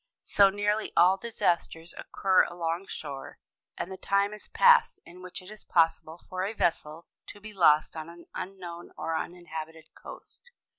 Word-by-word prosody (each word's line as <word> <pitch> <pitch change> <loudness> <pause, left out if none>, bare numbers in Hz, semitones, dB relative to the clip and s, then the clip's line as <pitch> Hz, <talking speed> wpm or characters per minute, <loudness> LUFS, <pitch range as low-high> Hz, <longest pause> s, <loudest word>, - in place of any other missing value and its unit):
So 200 -1 +5
nearly 205 +2 -1
all 185 +3 +6
disasters 175 -6 -1
occur 190 -1 +2
along 170 +2 -3
shore; 140 -3 -7 0.4
and 190 - -4
the 190 - -6
time 200 +2 +1
is 210 - -9
past 485 0 +5
in 180 +2 -13
which 185 0 -7
it 185 - -11
is 215 - -10
possible 165 0 +1
for 185 0 -3
a 200 +3 -2
vessel 165 -4 -1 0.2
to 205 - -10
be 215 +1 -10
lost 155 -6 +4
on 160 0 -6
an 170 0 -13
unknown 175 -3 -7
or 165 - -2
uninhabited 160 -2 -7
coast. 485 - -13
180 Hz, 160 wpm, -28 LUFS, 165-200 Hz, 0.4 s, all